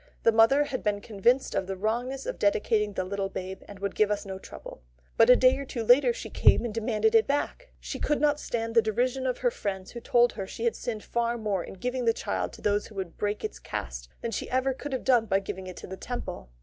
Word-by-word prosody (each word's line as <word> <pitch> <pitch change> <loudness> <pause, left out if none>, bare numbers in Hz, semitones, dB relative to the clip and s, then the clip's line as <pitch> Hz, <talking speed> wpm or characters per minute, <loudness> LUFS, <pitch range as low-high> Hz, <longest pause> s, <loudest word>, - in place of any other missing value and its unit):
The 230 - +6
mother 225 +6 +5
had 270 -3 -4
been 205 -1 +1
convinced 235 +6 +1
of 190 - -1
the 195 - -3
wrongness 245 +6 -2
of - - -4
dedicating 210 +1 +2
the 185 - -1
little 195 +1 -3
babe, 190 0 -6
and 200 - -10
would 200 0 -3
give 215 -1 +3
us 210 -1 -1
no 190 -1 -6
trouble. - - -11 0.3
But 225 - +5
a 250 - +10
day 255 +1 +5
or - - -3
two 245 -3 -4
later, 250 - +6
she 475 - -7
came - - +4
and 230 - -3
demanded 230 - +1
it 450 -1 +5
back. 290 - -2
She - - -6
could 295 - +1
not 295 0 +2
stand 230 -4 -3
the 230 - +6
derision 250 +4 0
of 250 - -1
her - - +1
friends, 190 - -4
who 240 - -7
told 240 +1 +3
her 195 -3 -5
she 225 - -7
had 235 - +2
sinned 220 -3 -4
far 235 0 -1
more 205 -5 -1
in - - -9
giving 250 +4 -2
her 230 - +5
child - - -2
to - - -13
those 205 0 +1
who 215 - -15
would 185 -4 -5
break 205 0 -1
its - - -4
caste - - -6
than 235 - -3
she - - -4
ever 260 +1 +1
could 285 +2 -7
have 260 - -2
done 245 -4 +3
had 195 - +5
she 195 - -4
given 190 0 -9
it 185 - -8
to - - -8
the 190 - -7
Temple. 240 - -6
225 Hz, 260 wpm, -28 LUFS, 200-255 Hz, 0.3 s, a